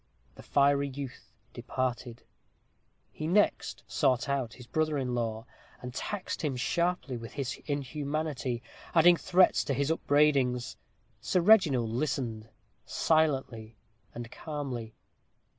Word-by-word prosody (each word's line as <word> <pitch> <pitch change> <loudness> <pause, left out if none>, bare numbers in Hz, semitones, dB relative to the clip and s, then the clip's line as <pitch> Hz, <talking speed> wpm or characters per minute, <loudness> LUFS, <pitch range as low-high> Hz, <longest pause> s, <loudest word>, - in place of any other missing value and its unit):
The - - -13
fiery 140 0 +3
youth 135 -1 -8 0.2
departed. 125 -2 -3 0.9
He 155 - -5
next 205 +5 +1
sought 130 0 +1
out 135 -5 -1
his 125 - -12
brother 155 +4 0
in 130 -2 -2
law, 115 -1 -2 0.3
and 125 0 -7
taxed 200 +8 -4
him 145 -4 -1
sharply 170 0 -1
with 115 -1 -9
his 140 -3 -4
inhumanity, 145 -3 -2 0.3
adding 175 +1 +7
threats 185 +2 +3
to 140 - -1
his 140 +3 0
upbraidings. 140 -6 +2 0.5
Sir 185 - +1
Reginald 155 - +5
listened 115 -4 -2 0.3
silently 135 -9 0 0.4
and 120 0 -7
calmly. 130 -8 -5
140 Hz, 115 wpm, -30 LUFS, 120-155 Hz, 0.9 s, adding